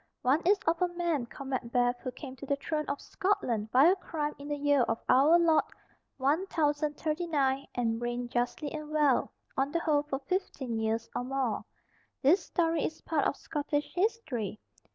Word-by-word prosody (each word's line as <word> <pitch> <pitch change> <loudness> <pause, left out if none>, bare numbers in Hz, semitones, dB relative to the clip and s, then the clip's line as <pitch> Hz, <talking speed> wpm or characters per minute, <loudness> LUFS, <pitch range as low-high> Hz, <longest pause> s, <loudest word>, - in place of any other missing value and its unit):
One 270 +6 +3
is 405 +2 +6
of 330 +2 +1
a 360 - +4
man 340 -7 -1
called 275 +3 -8
Macbeth 245 -1 +1
who 255 - -5
came 260 0 -9
to 280 - -8
the 280 - +2
throne 300 +2 -2
of 280 - -2
Scotland 245 - -1
by 260 +5 +6
a 360 +3 +6
crime 305 -5 -3
in 285 - -8
the 295 - -1
year 285 -1 +3
of 225 -1 +1
our 285 +6 +6
Lord 335 -2 +4 0.5
1039, 295 -1 0
and 230 -1 0
reigned 240 0 -3
justly 245 +4 -1
and 305 -1 -6
well, 300 -4 +2 0.2
on 270 +1 0
the 335 - +1
whole, 300 -3 +2
for 290 -2 -3
fifteen 270 - -3
years 220 +1 -1
or - - -1
more. 260 -3 -1 0.6
This 340 +7 +5
story 330 -2 0
is 315 - -3
part 310 -4 0
of - - -1
Scottish 295 -1 -3
history. 315 - -1
290 Hz, 175 wpm, -30 LUFS, 255-320 Hz, 0.6 s, is